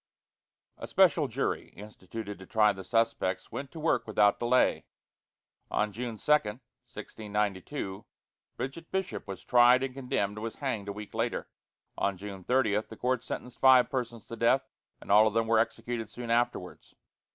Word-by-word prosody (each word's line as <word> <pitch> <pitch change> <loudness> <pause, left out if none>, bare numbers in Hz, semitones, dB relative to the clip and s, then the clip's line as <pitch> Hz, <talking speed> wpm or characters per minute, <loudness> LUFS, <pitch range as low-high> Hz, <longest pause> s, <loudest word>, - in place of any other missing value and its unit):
A - - -6
special - - +4
jury, - - -2
instituted 105 +1 -8
to 95 - -12
try 110 -4 +4
the 95 - -8
suspects, 115 -4 0
went 140 - -5
to 160 - -10
work 160 -5 +1
without 105 -1 +3
delay. 125 +2 +2 0.8
On 105 0 0
June 115 +1 -5
2, - - -10
1692, 105 -4 -3 0.5
Bridget 135 +7 -6
Bishop 190 - -3
was 95 -1 -7
tried 125 +2 +5
and 135 -1 -3
condemned 105 -6 -2
and - - -7
was 115 - -4
hanged 120 -8 -3
a - - -2
week 105 +1 -9
later. 115 +1 -2 0.5
On 100 -1 0
June 95 -1 -8
30 115 -3 +2
the 110 - -10
court 125 0 0
sentenced 125 -1 -7
five 130 -2 +6
persons 120 -5 -3
to 115 - -7
death, 120 +4 +3 0.3
and - - -6
all 105 +2 +7
of 110 - -2
them 115 0 +2
were 110 0 +3
executed 115 0 -2
soon 120 -1 -6
afterwards. 120 +1 -1
115 Hz, 165 wpm, -29 LUFS, 105-125 Hz, 0.8 s, all